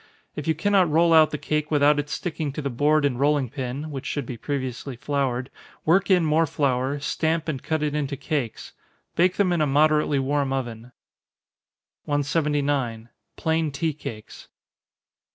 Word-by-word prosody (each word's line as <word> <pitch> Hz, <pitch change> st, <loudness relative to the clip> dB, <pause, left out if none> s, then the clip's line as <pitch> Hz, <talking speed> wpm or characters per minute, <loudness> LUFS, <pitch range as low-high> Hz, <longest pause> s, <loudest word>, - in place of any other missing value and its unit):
If 150 Hz, -, -5 dB
you 160 Hz, -, +2 dB
cannot 195 Hz, +1 st, +3 dB
roll 165 Hz, +2 st, +4 dB
out 155 Hz, -1 st, +7 dB
the 150 Hz, -, -3 dB
cake 150 Hz, 0 st, -2 dB
without 145 Hz, 0 st, +4 dB
its 145 Hz, 0 st, -4 dB
sticking 160 Hz, -5 st, -3 dB
to 150 Hz, -, -4 dB
the 140 Hz, -, -2 dB
board 150 Hz, +4 st, +2 dB
and 125 Hz, -3 st, 0 dB
rolling 140 Hz, -3 st, +2 dB
pin, 135 Hz, +3 st, -4 dB
(which 135 Hz, -2 st, -5 dB
should 145 Hz, -3 st, -2 dB
be 125 Hz, -, -6 dB
previously 130 Hz, 0 st, -4 dB
floured,) 130 Hz, -1 st, -2 dB, 0.3 s
work 180 Hz, +5 st, +3 dB
in 180 Hz, -3 st, +4 dB
more 160 Hz, +1 st, +3 dB
flour, 140 Hz, 0 st, 0 dB
stamp 160 Hz, +3 st, -1 dB
and 140 Hz, -5 st, -3 dB
cut 160 Hz, -1 st, -1 dB
it 150 Hz, -1 st, -1 dB
into 145 Hz, -2 st, -2 dB
cakes 140 Hz, -4 st, -3 dB, 0.4 s
bake 180 Hz, +2 st, +3 dB
them 190 Hz, -3 st, +2 dB
in 170 Hz, -, +1 dB
a 150 Hz, -, +3 dB
moderately 150 Hz, +1 st, +3 dB
warm 140 Hz, 0 st, 0 dB
oven. 120 Hz, -2 st, -5 dB, 1.1 s
179. 145 Hz, -5 st, 0 dB, 0.3 s
_Plain 160 Hz, -1 st, 0 dB
Tea 155 Hz, +3 st, -1 dB
Cakes. 110 Hz, -7 st, -9 dB
145 Hz, 165 wpm, -24 LUFS, 135-155 Hz, 1.1 s, out